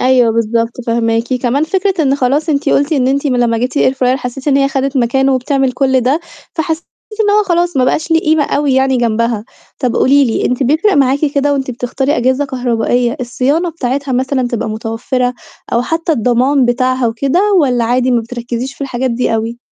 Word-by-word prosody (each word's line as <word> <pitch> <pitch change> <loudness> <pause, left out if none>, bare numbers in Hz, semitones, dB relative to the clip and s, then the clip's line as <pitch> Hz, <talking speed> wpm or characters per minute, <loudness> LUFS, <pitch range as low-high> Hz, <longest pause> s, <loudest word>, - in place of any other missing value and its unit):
أيوه 250 -3 +3
بالضبط، 230 +1 0 0.2
فاهماكِ. 230 +1 0
كمان 255 +4 0
فكرة 375 0 0
إن 275 -1 +2
خلاص 285 +4 0
أنتِ 285 -2 0
قُلتِ 285 +3 +1
إن 260 -3 +2
أنتِ 280 +2 0
م 255 -2 +1
لمّا 230 -2 +1
جِبتِ 255 +4 -2
الair 260 - +3
fryer 255 0 +1
حسّيتِ 265 +2 -5
إن 275 - +3
هي 275 0 +2
خدت 275 0 -2
مكانه 265 +2 +2
وبتعمل 265 0 0
كل 265 0 +1
ده، 270 +7 +1 0.3
فحسّيتِ 320 0 -3 0.3
إن 415 -1 +3
هو 420 +1 +4
خلاص 345 -3 0
ما 255 - +3
بقاش 315 +5 -1
ليه 325 0 +4
قيمة 310 -1 +2
أوي 285 -2 0
يعني 265 0 +2
جنبها. 230 -2 0 0.3
طَب 245 -3 -1
قولي 280 +1 +4
لي 230 - -1
أنتِ 250 +2 -1
بيفرق 315 - +2
معاكِ 275 0 +3 0.2
كده 285 0 +2
وأنتِ 270 -2 -2
بتختاري 260 +4 -2
أجهزة 260 +4 +1
كهربائية 245 -1 -1
الصيانة 275 +8 0
بتاعتها 275 -2 -3
مثلًا 260 0 0
تبقى 235 -2 -3
متوفّرة 230 +3 -2 0.4
أو 235 - +2
حتّى 325 +4 -1
الضمان 250 +2 +2
بتاعها 255 0 +1
وكده 280 - 0
والّا 255 -10 +2
عادي 250 +2 +1
ما 240 -2 +2
بتركِّزيش 240 +2 -5
في - - -25
الحاجات 260 -1 -2
دي 235 -1 0
أوي؟ 225 +2 -3
260 Hz, 195 wpm, -14 LUFS, 245-285 Hz, 0.4 s, هو